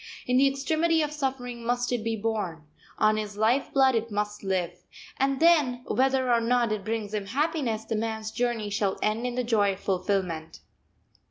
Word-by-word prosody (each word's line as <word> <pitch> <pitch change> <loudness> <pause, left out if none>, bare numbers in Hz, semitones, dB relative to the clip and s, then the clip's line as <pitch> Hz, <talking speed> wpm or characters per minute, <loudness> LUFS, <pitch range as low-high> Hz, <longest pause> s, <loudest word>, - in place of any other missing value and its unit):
In 250 0 +2
the 275 +1 +6
extremity 315 +4 +1
of 300 - -2
suffering 260 -5 -3
must 245 +1 0
it 240 -3 -1
be 225 0 -1
born; 205 -7 -3 0.3
on 215 0 +3
his 210 -1 -4
life 230 +6 +2
blood 265 -1 +4
it 230 0 -1
must 210 0 -3
live; 180 -2 -2 0.3
and 270 0 +1
then, 295 -8 +4
whether 260 -1 +1
or 235 - +3
not 235 -1 +2
it 215 -2 -2
brings 215 -1 -3
him 205 -2 -3
happiness, 260 -3 -1
the 225 - -2
man's 220 0 -3
journey 235 -3 -1
shall 200 -1 0
end 220 +3 0
in 245 - -4
the 250 - 0
joy 210 -4 +2
of 190 - -11
fulfilment. 180 -4 -2
230 Hz, 185 wpm, -27 LUFS, 210-260 Hz, 0.3 s, the